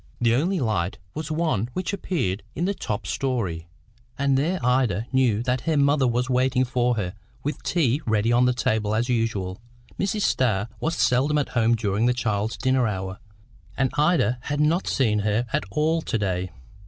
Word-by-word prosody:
The 115 -1 +3
only 170 +9 +1
light 105 - -1 0.2
was 155 0 -5
one 155 - 0
which 185 +1 -3
appeared 125 - -2
in 170 - -1
the 200 - +1
top 110 - -4
storey, 100 -11 -2 0.5
and 140 -1 +2
there 165 +7 +1
Ida 125 -5 +2
knew 120 -4 +2
that 125 0 0
her 155 - +2
mother 140 -1 +3
was 120 +1 0
waiting 130 0 +2
for 125 -1 +1
her, 95 -5 -3 0.3
with 145 0 -3
tea 145 -5 +1
ready 110 +1 +2
on 120 +1 +4
the 125 - +4
table 110 -4 0
as 120 +3 0
usual. 110 -5 -1 0.4
Mrs. 205 +2 0
Starr 110 -4 +1
was 160 +1 -1
seldom 135 +5 +2
at 145 - 0
home 115 -1 +2
during 105 +1 0
the 125 - +2
child's 110 -2 -1
dinner 130 -2 +2
hour, 95 -2 -4 0.6
and 135 -1 +1
Ida 145 - +2
had 145 +2 -3
not 160 +5 +2
seen 110 -6 +2
her 105 +3 0
at - - 0
all 160 +7 +1
to 115 - -2
day. 95 -3 -1
125 Hz, 180 wpm, -24 LUFS, 110-145 Hz, 0.6 s, on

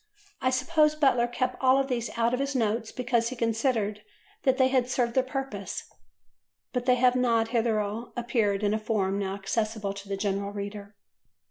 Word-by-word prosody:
I 255 - +2
suppose 305 +3 +2
Butler 265 -5 +3
kept 255 +1 -2
all 265 +1 +5
these 245 -3 -2
out 235 +1 +2
of 250 - 0
his 275 0 -2
notes 225 -1 0
because 240 -2 0
he 255 - -6
considered 225 -3 0 0.4
that 265 -2 +2
they 260 -1 +4
had 255 -2 +1
served 245 -1 0
their 260 - +4
purpose; 260 -7 -4 0.9
but 250 0 -2
they 250 - +6
have 250 0 +3
not 230 -3 +2
hitherto 225 -1 -1
appeared 225 -4 0
in 205 0 +2
a 215 - 0
form 200 -3 0
now 195 -1 -2
accessible 210 0 -2
to 200 0 -10
the 195 - -2
general 200 0 -2
reader. 200 0 -6
235 Hz, 175 wpm, -27 LUFS, 210-255 Hz, 0.9 s, they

